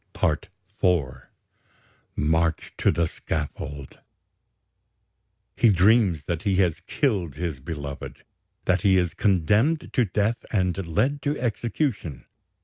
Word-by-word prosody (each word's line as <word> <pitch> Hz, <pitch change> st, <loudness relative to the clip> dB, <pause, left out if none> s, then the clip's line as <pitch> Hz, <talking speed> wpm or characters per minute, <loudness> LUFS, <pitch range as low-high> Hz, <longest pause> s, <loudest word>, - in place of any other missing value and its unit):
"PART 80 Hz, +5 st, 0 dB, 0.3 s
IV 70 Hz, -9 st, +1 dB, 0.9 s
"MARCH 80 Hz, +2 st, 0 dB
TO -, -, +2 dB
THE 85 Hz, -, +2 dB
SCAFFOLD 75 Hz, -3 st, -5 dB, 1.6 s
"He 120 Hz, -, +4 dB
dreams 95 Hz, -, +4 dB
that 85 Hz, +1 st, -3 dB
he 100 Hz, 0 st, +1 dB
has 90 Hz, -4 st, +2 dB
killed 95 Hz, -, 0 dB
his 80 Hz, -4 st, -3 dB
beloved, 70 Hz, -1 st, -7 dB, 0.4 s
that 95 Hz, -1 st, +2 dB
he 95 Hz, -1 st, +4 dB
is 90 Hz, -2 st, +1 dB
condemned 105 Hz, -, +2 dB
to 125 Hz, -, +3 dB
death 105 Hz, +4 st, 0 dB
and 95 Hz, -3 st, 0 dB
led 130 Hz, -, 0 dB
to 145 Hz, +2 st, -1 dB
execution. 115 Hz, -, -2 dB
90 Hz, 115 wpm, -25 LUFS, 80-105 Hz, 1.6 s, He